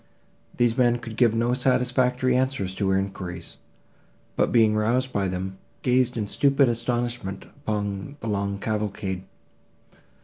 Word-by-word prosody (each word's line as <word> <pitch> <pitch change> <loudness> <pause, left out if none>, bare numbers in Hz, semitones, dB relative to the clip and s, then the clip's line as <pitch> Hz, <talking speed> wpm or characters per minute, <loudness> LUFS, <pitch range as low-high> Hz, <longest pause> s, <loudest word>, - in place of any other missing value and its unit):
These 120 +1 +2
men 120 -1 +4
could 115 -2 -8
give 115 -1 +3
no 120 +2 +1
satisfactory 125 0 +2
answers 130 -8 0
to 95 0 -1
her 95 - +3
enquiries, 90 -3 -5 0.8
but, - - +2
being 110 -3 +5
roused 120 +5 +1
by 100 -1 +1
them, 95 +1 -4 0.2
gazed 125 -1 +2
in 110 - -1
stupid 140 +5 +3
astonishment 120 -3 -2
upon 105 +4 -4
the 115 - -6
long 100 -1 -1
cavalcade. 100 -3 -3
115 Hz, 135 wpm, -25 LUFS, 100-125 Hz, 0.8 s, being